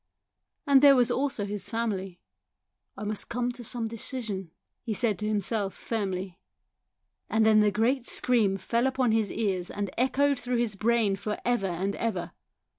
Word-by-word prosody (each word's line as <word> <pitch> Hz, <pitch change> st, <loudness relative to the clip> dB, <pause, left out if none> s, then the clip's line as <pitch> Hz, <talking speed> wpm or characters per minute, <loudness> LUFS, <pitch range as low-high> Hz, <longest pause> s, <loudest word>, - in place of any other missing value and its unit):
And 280 Hz, -2 st, +6 dB
there 280 Hz, -1 st, +8 dB
was 245 Hz, -2 st, +3 dB
also 265 Hz, -6 st, -1 dB
his 200 Hz, -1 st, -4 dB
family. 200 Hz, -5 st, -3 dB, 0.4 s
" -, -, -49 dB
I 205 Hz, -, -6 dB
must 210 Hz, 0 st, -3 dB
come 245 Hz, +1 st, -1 dB
to 245 Hz, 0 st, -9 dB
some 230 Hz, 0 st, -2 dB
decision," 220 Hz, -5 st, -5 dB, 0.3 s
he 225 Hz, -3 st, -3 dB
said 210 Hz, -4 st, 0 dB
to 210 Hz, -, -2 dB
himself 205 Hz, -1 st, -1 dB
firmly. 190 Hz, -5 st, -3 dB, 0.9 s
And 220 Hz, 0 st, +3 dB
then 215 Hz, -1 st, +6 dB
the 210 Hz, 0 st, +5 dB
great 235 Hz, +5 st, 0 dB
scream 215 Hz, -6 st, +2 dB
fell 235 Hz, +6 st, 0 dB
upon 260 Hz, -3 st, +1 dB
his 220 Hz, -2 st, +1 dB
ears 190 Hz, -5 st, -1 dB
and 200 Hz, -2 st, -4 dB
echoed 275 Hz, +2 st, +2 dB
through 245 Hz, 0 st, -1 dB
his 235 Hz, -3 st, 0 dB
brain 220 Hz, -1 st, +2 dB
for 210 Hz, +2 st, -3 dB
ever 240 Hz, -5 st, +1 dB
and 190 Hz, +3 st, -2 dB
ever. 230 Hz, -1 st, -2 dB
220 Hz, 170 wpm, -28 LUFS, 200-245 Hz, 0.9 s, there